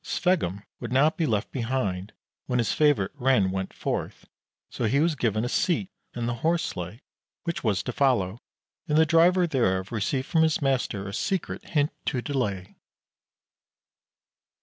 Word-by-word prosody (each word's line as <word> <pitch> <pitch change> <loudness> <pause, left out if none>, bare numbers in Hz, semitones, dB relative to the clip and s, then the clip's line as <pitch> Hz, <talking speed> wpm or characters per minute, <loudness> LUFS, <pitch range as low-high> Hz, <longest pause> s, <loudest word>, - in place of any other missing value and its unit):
Sveggum 150 - 0 0.2
would 120 -2 -6
not 145 +5 +4
be 165 -2 0
left 105 -1 -1
behind 110 -6 -2 0.4
when 125 - 0
his 115 -4 +1
favorite 145 -11 +3
Ren 130 -8 +2
went 95 0 -3
forth, - - -4 0.4
so 120 - -3
he 135 +6 +2
was 165 +2 +3
given 110 -5 0
a - - 0
seat 185 +8 0 0.2
in 120 -1 -2
the 120 - 0
horse 170 +1 +2
sleigh 90 +8 -6 0.4
which 170 -1 -3
was 105 -5 +1
to 125 - -4
follow, 120 -7 +1 0.5
and 150 - +2
the 160 - +6
driver 175 +3 +4
thereof 100 - 0
received 120 +4 -1
from 160 - +2
his 160 -1 +3
master 125 -8 0
a 100 - -6
secret 190 - -2
hint 150 -2 +1
to 130 - 0
delay. 120 -9 -3
125 Hz, 160 wpm, -26 LUFS, 100-155 Hz, 0.5 s, the